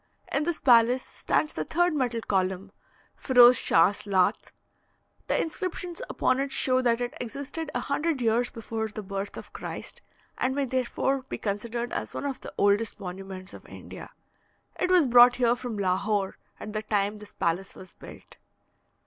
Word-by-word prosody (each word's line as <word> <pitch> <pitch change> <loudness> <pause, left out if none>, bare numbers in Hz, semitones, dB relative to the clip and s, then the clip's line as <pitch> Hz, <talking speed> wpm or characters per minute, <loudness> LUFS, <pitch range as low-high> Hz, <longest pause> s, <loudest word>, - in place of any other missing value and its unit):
In 290 +2 0
this 345 -1 -1
palace 245 0 +5
stands 305 - -1
the - - -3
third 350 +1 +1
metal 245 -5 -1
column 190 -1 -1 0.4
Feroze 250 -1 +6
Schachs 195 +5 +2
Laht. 190 -2 +1 0.8
The - - +1
inscriptions 360 +2 -4
upon 255 0 +1
it 275 0 -2
show 255 -1 +2
that 240 -1 +1
it 245 0 -3
existed 280 +6 -5
a - - 0
hundred 295 +1 -1
years 240 +1 +1
before 225 -1 -4
the 215 0 -7
birth 195 +1 -5
of - - -10
Christ, - - -7 0.4
and 260 +1 0
may 280 -1 0
therefore 260 +1 -1
be - - -3
considered 235 +4 -3
as - - -4
one - - -4
of 275 -2 -4
the - - -8
oldest 205 +1 +2
monuments 190 0 -8
of - - -11
India. - - -10 0.7
It 365 - +1
was 365 -4 +5
brought 245 0 +7
here 240 -1 +2
from 245 -3 -6
Lahore 195 +1 0 0.2
at 210 - -7
the 215 - -2
time 210 -1 -1
this 210 -1 -13
palace 175 +3 -2
was 185 - -12
built. - - -14
235 Hz, 165 wpm, -27 LUFS, 200-265 Hz, 0.8 s, brought